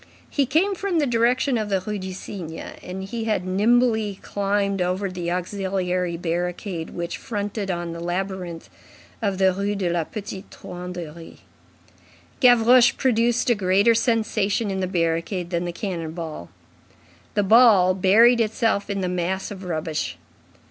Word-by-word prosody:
He 280 Hz, -3 st, +1 dB
came 335 Hz, +9 st, +2 dB
from 385 Hz, -2 st, -2 dB
the 300 Hz, -, +3 dB
direction 245 Hz, +1 st, +2 dB
of 215 Hz, -1 st, -3 dB
the 195 Hz, -1 st, +1 dB
Rue 210 Hz, +2 st, -4 dB
du 190 Hz, 0 st, -5 dB
Cygne, 180 Hz, -3 st, -7 dB
and 185 Hz, +1 st, -6 dB
he 225 Hz, +3 st, -4 dB
had 210 Hz, -5 st, 0 dB
nimbly 220 Hz, +1 st, +2 dB
climbed 200 Hz, -1 st, -1 dB
over 185 Hz, +2 st, -1 dB
the 175 Hz, -2 st, -4 dB
auxiliary 180 Hz, -1 st, -2 dB
barricade 175 Hz, 0 st, -3 dB
which 170 Hz, 0 st, -4 dB
fronted 205 Hz, -2 st, -4 dB
on 175 Hz, -2 st, -2 dB
the 170 Hz, -, -7 dB
labyrinth 175 Hz, -1 st, -4 dB, 0.5 s
of 200 Hz, -3 st, 0 dB
the 190 Hz, -1 st, +3 dB
Rue 200 Hz, +2 st, -1 dB
de 185 Hz, -3 st, -1 dB
la 170 Hz, -1 st, 0 dB
Petite 195 Hz, +2 st, -7 dB
Truanderie. 175 Hz, -2 st, -8 dB, 1.0 s
Gavroche 245 Hz, -1 st, +6 dB
produced 240 Hz, -1 st, +2 dB
a -, -, +6 dB
greater 200 Hz, +2 st, +3 dB
sensation 220 Hz, -2 st, +1 dB
in 190 Hz, -, -2 dB
the 185 Hz, -, -1 dB
barricade 170 Hz, 0 st, -1 dB
than 170 Hz, 0 st, -1 dB
the 175 Hz, -, -2 dB
cannon 170 Hz, -3 st, -4 dB
ball. 160 Hz, -, -6 dB, 0.9 s
The 205 Hz, -, +3 dB
ball 205 Hz, -4 st, +6 dB
buried 225 Hz, +6 st, +5 dB
itself 220 Hz, -2 st, 0 dB
in 200 Hz, -1 st, -2 dB
the 185 Hz, -, -1 dB
mass 180 Hz, +2 st, -2 dB
of 195 Hz, -1 st, -8 dB
rubbish. 160 Hz, -3 st, -3 dB
195 Hz, 150 wpm, -23 LUFS, 180-220 Hz, 1.0 s, Gavroche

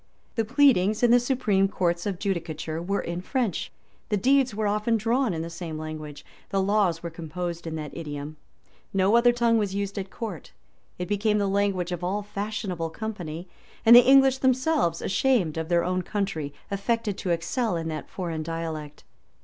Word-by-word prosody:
The 225 Hz, -, 0 dB
pleadings 220 Hz, -4 st, +3 dB
in 240 Hz, -, +5 dB
the 245 Hz, -, +7 dB
supreme 235 Hz, -6 st, +2 dB
courts 175 Hz, -2 st, -1 dB
of 195 Hz, -3 st, -2 dB
judicature 165 Hz, -4 st, -3 dB
were 200 Hz, +3 st, -1 dB
in 170 Hz, +1 st, -4 dB
French:[*] 235 Hz, -, -1 dB, 0.4 s
the 210 Hz, -, +1 dB
deeds 260 Hz, +1 st, +3 dB
were 215 Hz, 0 st, -1 dB
often 210 Hz, +3 st, +1 dB
drawn 235 Hz, +3 st, +1 dB
in 165 Hz, -2 st, -3 dB
the 165 Hz, -, -5 dB
same 165 Hz, -2 st, -6 dB
language: 155 Hz, -2 st, -7 dB, 0.2 s
the 195 Hz, -, 0 dB
laws 190 Hz, -4 st, +1 dB
were 170 Hz, -, -4 dB
composed 170 Hz, +1 st, -5 dB
in 160 Hz, -, -4 dB
that 155 Hz, -1 st, -6 dB
idiom:[] 150 Hz, -2 st, -6 dB, 0.6 s
no 195 Hz, +3 st, +4 dB
other 240 Hz, +1 st, +6 dB
tongue 235 Hz, -1 st, +2 dB
was 200 Hz, -2 st, -1 dB
used 200 Hz, 0 st, -2 dB
at 190 Hz, 0 st, -5 dB
court: 205 Hz, -8 st, -7 dB, 0.4 s
it 180 Hz, -, -4 dB
became 210 Hz, +1 st, +1 dB
the 205 Hz, -, +1 dB
language 195 Hz, -3 st, 0 dB
of 175 Hz, 0 st, -4 dB
all 200 Hz, +3 st, -1 dB
fashionable 200 Hz, -5 st, -3 dB
company; 175 Hz, -3 st, -6 dB, 0.4 s
and 230 Hz, +1 st, +10 dB
the -, -, +12 dB
English 265 Hz, 0 st, +5 dB
themselves, 260 Hz, -, +1 dB
ashamed 195 Hz, -, +2 dB
of 160 Hz, 0 st, -3 dB
their 170 Hz, -1 st, +3 dB
own 185 Hz, 0 st, 0 dB
country, 180 Hz, -7 st, -3 dB, 0.2 s
affected 210 Hz, +1 st, -1 dB
to 185 Hz, -, -3 dB
excel 175 Hz, +6 st, 0 dB
in 165 Hz, -1 st, -3 dB
that 155 Hz, -1 st, -5 dB
foreign 170 Hz, -4 st, -4 dB
dialect. 155 Hz, -2 st, -5 dB
195 Hz, 180 wpm, -26 LUFS, 165-220 Hz, 0.6 s, the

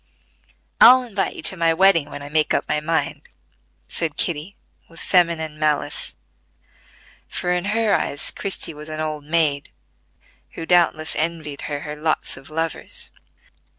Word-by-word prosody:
"I'll 255 Hz, +2 st, +9 dB
invite 205 Hz, -5 st, -2 dB
you -, -, -8 dB
to -, -, -2 dB
my 165 Hz, -1 st, +2 dB
wedding 165 Hz, -5 st, +4 dB
when 145 Hz, -, -8 dB
I 145 Hz, -, -8 dB
make 155 Hz, 0 st, +2 dB
up -, -, -1 dB
my 150 Hz, -, +1 dB
mind," 160 Hz, +2 st, -2 dB, 0.6 s
said 165 Hz, -3 st, -3 dB
Kitty, 170 Hz, +3 st, -2 dB, 0.3 s
with 165 Hz, -1 st, -14 dB
feminine 165 Hz, -4 st, +1 dB
malice; 150 Hz, -1 st, -1 dB, 1.1 s
for 180 Hz, -, -2 dB
in 180 Hz, +1 st, -1 dB
her 215 Hz, +1 st, +2 dB
eyes 145 Hz, -, -1 dB
Christie 195 Hz, -4 st, -3 dB
was 150 Hz, +1 st, -10 dB
an 155 Hz, 0 st, -5 dB
old 155 Hz, -2 st, -3 dB
maid 150 Hz, -3 st, +1 dB, 0.8 s
who 165 Hz, -, -6 dB
doubtless 165 Hz, -3 st, +3 dB
envied 155 Hz, -3 st, -3 dB
her 145 Hz, -1 st, -3 dB
her 150 Hz, -1 st, -6 dB
"lots 155 Hz, +1 st, -1 dB
of 135 Hz, +2 st, -13 dB
lovers." 160 Hz, 0 st, 0 dB
160 Hz, 150 wpm, -22 LUFS, 150-175 Hz, 1.1 s, I'll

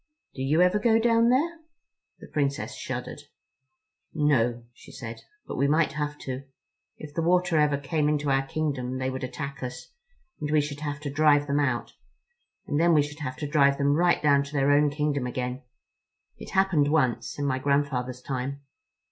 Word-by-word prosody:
"Do 130 Hz, -, -7 dB
you 150 Hz, +6 st, +3 dB
ever 180 Hz, +3 st, +3 dB
go 225 Hz, +1 st, +4 dB
down 230 Hz, 0 st, +3 dB
there?" 320 Hz, +7 st, +1 dB, 0.6 s
The -, -, -11 dB
Princess 140 Hz, -2 st, -2 dB
shuddered. -, -, -5 dB, 0.9 s
"No," 120 Hz, -6 st, +2 dB
she -, -, -15 dB
said, 115 Hz, -2 st, -8 dB, 0.2 s
"but -, -, -6 dB
we 140 Hz, -, +2 dB
might 155 Hz, +1 st, +2 dB
have 150 Hz, 0 st, -3 dB
to. 130 Hz, +1 st, -5 dB, 0.5 s
If 150 Hz, -1 st, -10 dB
the 165 Hz, -, -1 dB
water 175 Hz, -1 st, +2 dB
ever 150 Hz, -1 st, +3 dB
came 150 Hz, +1 st, 0 dB
into 145 Hz, -1 st, 0 dB
our 135 Hz, 0 st, +2 dB
kingdom 135 Hz, -5 st, -2 dB
they 130 Hz, 0 st, -2 dB
would 130 Hz, 0 st, -5 dB
attack 140 Hz, +2 st, -5 dB
us, 125 Hz, -, -7 dB, 0.5 s
and 150 Hz, -, -3 dB
we 155 Hz, 0 st, +3 dB
should 145 Hz, 0 st, -3 dB
have 145 Hz, -1 st, -4 dB
to 145 Hz, -2 st, -4 dB
drive 145 Hz, -1 st, +4 dB
them 145 Hz, 0 st, 0 dB
out; 130 Hz, -5 st, -1 dB, 0.7 s
and 145 Hz, -, -1 dB
then 170 Hz, 0 st, +4 dB
we 150 Hz, -, +5 dB
should 150 Hz, +1 st, -8 dB
have 130 Hz, -4 st, -5 dB
to 150 Hz, -, -4 dB
drive 140 Hz, -2 st, +3 dB
them 140 Hz, 0 st, +2 dB
right 175 Hz, +2 st, +2 dB
down 140 Hz, -2 st, +5 dB
to 140 Hz, -, -11 dB
their 140 Hz, 0 st, +2 dB
own 145 Hz, +1 st, +4 dB
kingdom 145 Hz, -3 st, -1 dB
again. 125 Hz, +1 st, -4 dB, 0.8 s
It -, -, -9 dB
happened 190 Hz, -7 st, +3 dB
once, 130 Hz, -6 st, 0 dB
in 145 Hz, -, -2 dB
my 130 Hz, -2 st, 0 dB
grandfather's 130 Hz, -3 st, -1 dB
time." 135 Hz, +1 st, -4 dB
145 Hz, 185 wpm, -26 LUFS, 135-155 Hz, 0.9 s, we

